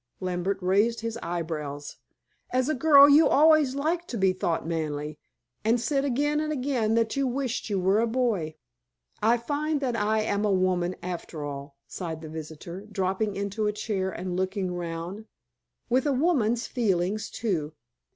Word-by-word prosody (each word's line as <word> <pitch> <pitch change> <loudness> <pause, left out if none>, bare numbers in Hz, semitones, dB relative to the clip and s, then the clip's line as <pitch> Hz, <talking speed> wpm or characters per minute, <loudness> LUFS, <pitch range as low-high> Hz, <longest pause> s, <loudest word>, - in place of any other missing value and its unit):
Lambert 185 +1 -1
raised 210 +5 +2
his 230 0 -4
eyebrows. 155 -4 -4 0.5
"As 255 +2 +1
a - - +2
girl 285 0 +7
you 290 +3 +7
always 300 -2 +5
liked 330 +5 -1
to 240 - -4
be 190 -2 +3
thought 170 -3 -1
manly, 150 -2 -3 0.4
and 230 +3 +3
said 275 +3 0
again 290 +3 +1
and 305 0 -1
again 250 -6 0
that 230 -1 +1
you 275 -1 +1
wished 250 -2 -2
you 200 -2 0
were 190 +3 +3
a 230 - +2
boy." 220 -10 0 0.7
"I 230 +2 +4
find 290 +5 -1
that 250 -3 -1
I 215 0 +1
am 205 -1 0
a 210 - +2
woman, 185 -1 +1
after 175 -3 -5
all," 140 0 -7
sighed 165 -4 -6
the 155 - -7
visitor, 160 +4 -8
dropping 195 +2 -1
into 200 +2 -2
a - - +2
chair 205 -3 -2
and 180 -1 -4
looking 185 0 -1
round; 175 +4 -5 0.6
"with 255 +4 +2
a 285 - +2
woman's 255 -6 +1
feelings, 205 -3 0
too." 165 -9 -2
210 Hz, 165 wpm, -27 LUFS, 175-255 Hz, 0.7 s, girl